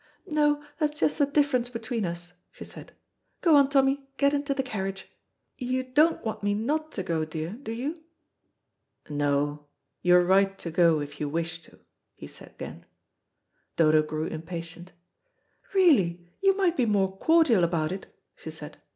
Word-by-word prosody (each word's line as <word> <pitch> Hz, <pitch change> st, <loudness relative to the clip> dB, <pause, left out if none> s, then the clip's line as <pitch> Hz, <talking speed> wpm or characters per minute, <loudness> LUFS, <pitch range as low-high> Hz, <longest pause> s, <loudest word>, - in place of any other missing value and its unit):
"No, 295 Hz, -1 st, +1 dB, 0.2 s
that's 300 Hz, -1 st, -1 dB
just 300 Hz, -, +1 dB
the 285 Hz, -, +4 dB
difference 285 Hz, -4 st, +1 dB
between 230 Hz, -2 st, -3 dB
us," 175 Hz, +1 st, -5 dB, 0.2 s
she -, -, -10 dB
said. -, -, -12 dB, 0.5 s
"Go 330 Hz, -4 st, +5 dB
on, 280 Hz, -1 st, +5 dB
Tommy, 275 Hz, 0 st, +2 dB
get 280 Hz, 0 st, +3 dB
into 285 Hz, 0 st, -1 dB
the 270 Hz, -, 0 dB
carriage. 195 Hz, -6 st, -4 dB, 0.5 s
You 255 Hz, 0 st, -1 dB
don't 300 Hz, +5 st, +2 dB
want 220 Hz, -, -3 dB
me 205 Hz, 0 st, 0 dB
not 305 Hz, +8 st, -1 dB
to 190 Hz, -, -3 dB
go, 165 Hz, -2 st, -1 dB
dear, 155 Hz, +1 st, -5 dB
do 225 Hz, +1 st, -7 dB
you?" 290 Hz, +8 st, -4 dB, 1.1 s
"No, 145 Hz, 0 st, -1 dB, 0.3 s
you 180 Hz, 0 st, +5 dB
are 180 Hz, 0 st, +5 dB
right 195 Hz, +1 st, +3 dB
to 170 Hz, -, -6 dB
go, 165 Hz, -2 st, +3 dB
if 145 Hz, 0 st, -8 dB
you 150 Hz, -, -2 dB
wish 165 Hz, +1 st, -3 dB
to," -, -, -18 dB, 0.4 s
he -, -, -9 dB
said -, -, -11 dB
again. -, -, -10 dB, 0.9 s
Dodo 155 Hz, -1 st, +4 dB
grew 155 Hz, +1 st, -3 dB
impatient. 170 Hz, +2 st, -7 dB, 0.8 s
"Really, 195 Hz, -, +4 dB, 0.2 s
you 390 Hz, 0 st, +3 dB
might 365 Hz, -4 st, +2 dB
be 250 Hz, -3 st, +2 dB
more 195 Hz, -2 st, +1 dB
cordial 320 Hz, -, +4 dB
about 165 Hz, -2 st, 0 dB
it," 190 Hz, +1 st, -6 dB, 0.3 s
she -, -, -9 dB
said. -, -, -10 dB
205 Hz, 165 wpm, -27 LUFS, 170-280 Hz, 1.1 s, Go